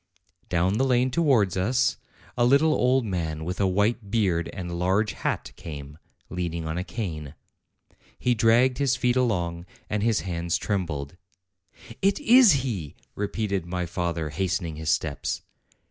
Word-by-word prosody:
Down 90 +5 +1
the - - +3
lane 130 -1 +2
towards 125 - +3
us 125 +8 +1 0.4
a 120 - +2
little 140 +5 +4
old 130 -1 +2
man 80 -5 -3
with 90 +3 -3
a 95 - +3
white 105 +3 0
beard 95 -6 +1
and 90 -3 -6
a 85 - -5
large 95 +5 +1
hat - - -3
came, 75 -1 -9 0.3
leaning 85 -2 -3
on 80 0 -3
a 90 - -2
cane. 85 - -5 0.8
He 125 - +1
dragged 120 +3 +3
his 135 -3 +2
feet 125 -1 +1
along, 90 -8 0 0.2
and 105 -1 0
his 115 0 +2
hands 85 -1 -2
trembled. 85 -7 -3 0.8
"It 195 +6 +2
is 240 - +6
he!" 90 - -4 0.2
repeated 100 -3 -2
my 90 0 -2
father, 85 -3 -2
hastening 90 -1 -2
his 80 0 -4
steps. 75 -1 -1
95 Hz, 150 wpm, -26 LUFS, 85-120 Hz, 0.8 s, is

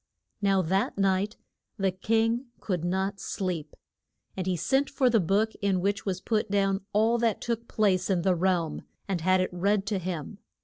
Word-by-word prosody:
Now 195 -2 +3
that 190 +5 0
night 195 +2 +1 0.4
the 195 -2 +1
king 225 +6 0
could 180 -5 -2
not 190 +3 -1
sleep. 175 -6 -3 0.6
And 185 -1 -3
he 185 -1 +1
sent 270 - +1
for 260 -3 +2
the 230 - +4
book 205 +5 +1
in 195 -2 +2
which 200 +2 -1
was 185 -1 -1
put 215 +1 0
down 195 0 +1
all 225 +3 +3
that 230 -2 +1
took 235 0 -3
place 190 -4 +1
in 180 -3 +1
the 185 - +3
realm, 175 -2 0 0.3
and 190 -4 -1
had 185 +2 +3
it 185 - -2
read 195 +3 +1
to 200 -2 -1
him. 180 +2 -5
195 Hz, 180 wpm, -28 LUFS, 185-215 Hz, 0.6 s, the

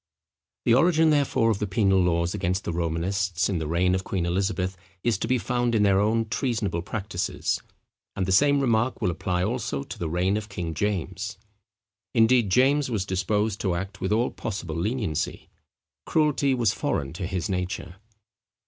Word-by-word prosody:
The - - +5
origin, 160 +3 +4
therefore, 135 -6 +2
of 105 - -1
the 105 - -1
penal 95 -1 +3
laws 85 -1 +1
against 90 +3 -1
the 85 - -3
Romanists, 85 +2 0
in 95 -4 0
the 80 - -3
reign 90 +3 +2
of 95 0 0
Queen 90 -3 -2
Elizabeth, 95 +1 -1 0.3
is 115 -5 +1
to - - -2
be 130 +2 +2
found 120 0 0
in 105 - +3
their 100 -1 +4
own 110 +2 +1
treasonable 110 -7 -1
practices; 95 -1 -2 0.5
and 95 - -1
the 95 - -1
same 140 +8 +4
remark 120 -1 +1
will 90 - +1
apply 90 +1 -1
also 110 - -2
to - - -9
the 85 - -2
reign 90 +5 +1
of 110 0 -5
King 85 -5 -4
James. 100 +3 -2 0.8
Indeed, 115 -1 +4
James 135 +7 +3
was 105 -6 -1
disposed 105 +3 0
to 95 -4 0
act 100 +3 -5
with 95 +2 -1
all 115 +3 +2
possible 95 -7 -5
leniency. 100 - -2 0.6
Cruelty 145 -3 +2
was 120 -3 +2
foreign 70 +1 -2
to 90 +1 -4
his 90 -2 -2
nature. 90 -1 -3
100 Hz, 175 wpm, -26 LUFS, 90-115 Hz, 0.8 s, The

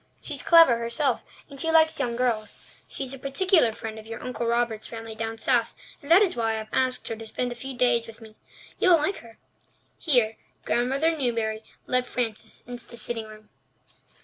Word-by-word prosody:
She's - - -3
clever 330 -9 +6
herself, 235 +3 0 0.2
and 275 - -11
she 325 - 0
likes 320 0 +4
young 235 -1 -1
girls. 235 -3 -2 0.2
She - - -4
is 265 0 -6
a 270 - -8
particular 275 - +3
friend 220 0 -7
of 215 - -13
your 225 - -7
Uncle 250 -2 -4
Robert's 235 -2 0
family 225 -1 -7
down 225 0 -4
south, 230 0 +1 0.3
and 285 - -12
that 360 +5 +8
is 385 - 0
why 225 -2 0
I - - -2
have 220 0 -7
asked 255 -1 +1
her 225 - -3
to 225 0 -9
spend 245 +3 -3
a 240 - -9
few 265 -1 -6
days 240 -2 +2
with 225 0 -12
me. 220 -2 -14 0.4
You'll 365 -5 +6
like 315 +6 -1
her." 230 -1 -14 0.6
Here 245 -8 +3 0.3
Grandmother 270 +7 +1
Newbury 230 -5 -1 0.2
led 250 0 0
Frances 230 -4 -4
into 245 0 -9
the 235 - -9
sitting 225 -1 -2
room. 215 0 -14
240 Hz, 200 wpm, -26 LUFS, 225-270 Hz, 0.6 s, that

